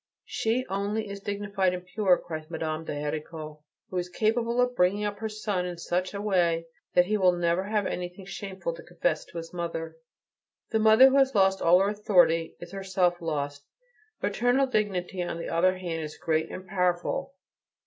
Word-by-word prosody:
"She 235 +3 0
only 205 +3 -2
is 200 0 -6
dignified 200 -2 -1
and 180 0 -8
pure," 185 -1 +3
cries 155 -1 -7
Madame 160 -1 -3
de - - -4
Héricourt, 150 +1 -5 0.3
"who 185 - -2
is 180 0 -4
capable 230 +5 0
of 250 0 +2
bringing 190 +2 +2
up 205 -1 -3
her 220 0 -3
son 210 -3 -2
in 180 -1 -5
such 180 +3 -2
a - - -3
way 170 -5 +2 0.3
that 180 - +6
he 215 +3 +1
will 185 -3 +4
never 175 +1 +1
have 210 -1 0
anything 180 +2 -4
shameful 190 -3 -5
to 165 - -10
confess 175 -2 -1
to - - -10
his 165 +1 -7
mother." 165 -2 -4 0.7
The 220 - +2
mother 220 +4 +8
who 270 - +3
has 270 -2 +3
lost 190 -1 +4
all 175 +2 +6
her 195 - +2
authority 175 -6 +3
is 175 0 -9
herself 190 -3 0
lost. 145 -3 -3 0.6
Maternal 245 +3 +2
dignity, 195 -6 -1
on 175 -1 -3
the 170 - -5
other 185 +3 +2
hand, 170 -3 -4
is 155 -1 -6
great 160 -1 0
and 185 - -7
powerful. 180 +9 -1
180 Hz, 185 wpm, -27 LUFS, 170-205 Hz, 0.7 s, mother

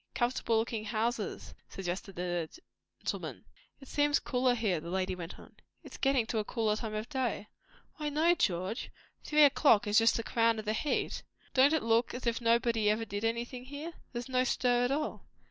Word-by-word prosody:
"Comfortable 240 -2 +1
looking 225 -1 -1
houses," 225 0 -2 0.2
suggested 190 +1 -5
the 175 -2 -2 0.5
gentleman. - - -4 0.3
"It 270 - -13
seems 290 +1 +2
cooler 250 -1 +1
here," 210 -8 0
the 170 - -8
lady 185 +1 -1
went 175 -2 -7
on. - - -15 0.3
"It - - -12
is - - -9
getting 270 -4 +2
to 225 -1 -1
a - - 0
cooler 220 -1 0
time 215 0 -4
of 215 +2 -3
day." 255 -7 -2 0.5
"Why, 300 -1 -2
no, 315 +4 +3
George! 190 - -1 0.3
Three 300 0 +4
o'clock 280 -6 +5
is 210 +2 +4
just 225 0 +4
the 230 - -3
crown 230 0 +2
of 215 - -5
the 215 - 0
heat. 285 +7 -1 0.3
Don't 270 +2 +6
it 315 - +1
look 230 +2 +2
as 250 - -6
if 235 0 0
nobody 230 -2 +2
ever 220 +2 +1
did 205 0 -5
anything 235 +2 -2
here? 290 +5 -7 0.2
There's 240 0 -5
no 255 -1 +2
stir 245 -1 +2
at 245 - 0
all." 300 +2 -3
230 Hz, 195 wpm, -31 LUFS, 215-260 Hz, 0.5 s, Don't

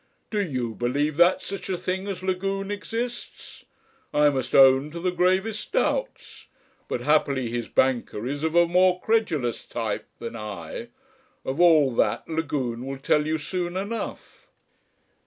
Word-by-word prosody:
Do 210 -2 +1
you 130 - -2
believe 140 +6 -1
that 175 +2 +4
such 195 0 -6
a 185 - -1
thing 190 +3 -3
as 195 -2 -5
Lagune 195 +1 -2
exists? 230 +4 -6 0.5
I 150 0 +4
must 130 -2 -2
own 135 +1 +6
to 170 +2 -7
the 180 +1 0
gravest 185 - 0
doubts. - - -2 0.4
But - - -3
happily 140 -5 +1
his 120 -1 -3
banker 120 -4 0
is 140 +3 -3
of 160 +1 -1
a 175 0 +6
more 180 +1 +3
credulous 175 - 0
type - - -4
than 115 0 -7
I.... 105 - -6 0.6
Of 135 +4 -3
all 155 -7 +5
that 105 +2 +1
Lagune 145 -7 -2
will 135 0 -4
tell 150 +2 +1
you 160 +1 +1
soon 175 +3 -3
enough." 210 +4 -6
160 Hz, 150 wpm, -25 LUFS, 130-185 Hz, 0.6 s, own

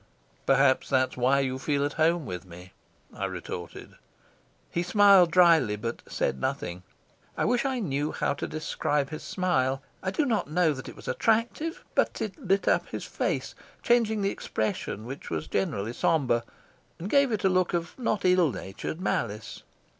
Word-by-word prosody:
"Perhaps 135 -1 +4
that's 130 -1 +2
why 130 +3 +3
you 130 -1 -2
feel 140 0 0
at 145 - -3
home 165 0 +2
with 90 -4 -5
me," 90 0 -13 0.4
I - - -3
retorted. 85 -1 -7 0.8
He 170 - 0
smiled 195 -1 +6
dryly, 165 - +5
but 115 +3 -5
said 65 - -2
nothing. 90 +6 -3 0.6
I - - +1
wish 245 +2 +1
I 265 -1 0
knew 150 - -1
how - - 0
to 145 - -4
describe 150 -2 -1
his 155 - -5
smile. 135 -7 0 0.2
I 185 - -1
do 290 +10 0
not 225 - 0
know 160 0 +2
that 130 -2 -8
it - - -11
was - - -13
attractive, 235 +9 0
but - - +1
it - - -3
lit 195 -6 0
up - - +2
his - - -5
face, - - -2 0.3
changing 220 -3 +2
the 195 - +1
expression, 110 0 -3
which 135 +4 -7
was 80 -1 -3
generally 100 +5 -2
sombre, 125 -6 +1 0.5
and 175 - -5
gave 280 +2 +3
it 215 -2 -1
a 190 - +4
look 185 -1 +2
of 170 -1 -3
not 215 -5 -1
ill 180 -4 +4
natured 95 - -6
malice. 110 - -2
155 Hz, 170 wpm, -27 LUFS, 130-190 Hz, 0.8 s, smiled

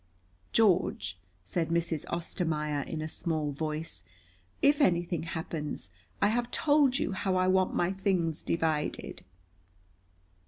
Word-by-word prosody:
"George," 175 - +2 0.2
said 165 - -2
Mrs. 165 -2 0
Ostermaier 155 -4 -1
in 155 -1 -3
a - - -2
small 155 -2 -2
voice, 150 - -3 0.6
"if 285 +1 +4
anything 175 - +2
happens, 160 - -4 0.3
I 205 - +5
have 240 +2 0
told 290 -3 +3
you - - -1
how 190 0 0
I 185 0 +3
want 185 0 +3
my 175 +1 +2
things 185 -5 0
divided." 160 -2 -1
170 Hz, 120 wpm, -30 LUFS, 155-190 Hz, 0.6 s, I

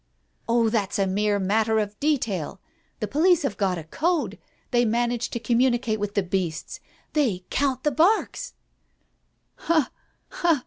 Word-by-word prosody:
"Oh, 230 -1 +3
that's 210 -4 0
a 195 - +2
mere 205 +2 +1
matter 215 +3 +1
of 210 -1 -2
detail. 230 - -1 0.4
The - - -1
police 335 +2 +3
have 245 -7 -1
got 190 -3 0
a 165 - -6
code— 325 - -1 0.3
they 240 -1 +4
manage 240 +1 0
to 235 - -3
communicate 240 -2 +1
with 205 0 -3
the 200 - +2
beasts. 180 -3 -3 0.3
They 220 -12 +1
count 265 -2 0
the 295 - +2
barks 415 - +1 0.5
" - - -47
"Ha! 315 -6 +3 0.4
ha! 335 -5 +2
230 Hz, 150 wpm, -25 LUFS, 200-285 Hz, 0.5 s, they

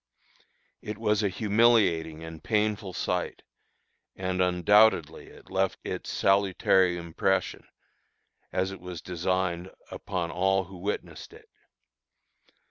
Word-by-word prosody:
It 105 0 -6
was 105 -1 +1
a 100 - +1
humiliating 100 -6 +2
and 80 -2 -9
painful 105 -2 0
sight, 90 0 -3 0.7
and 95 0 -2
undoubtedly 90 -2 +3
it - - -16
left 95 0 0
its - - -5
salutary 95 -2 +2
impression, 90 +3 -1 0.8
as 95 +1 -1
it 95 - -9
was 90 -2 -8
designed, 90 0 -2 0.2
upon 90 -4 -4
all 95 +2 +1
who 95 +1 -12
witnessed 100 +4 -5
it. - - -16
95 Hz, 110 wpm, -27 LUFS, 90-100 Hz, 0.8 s, undoubtedly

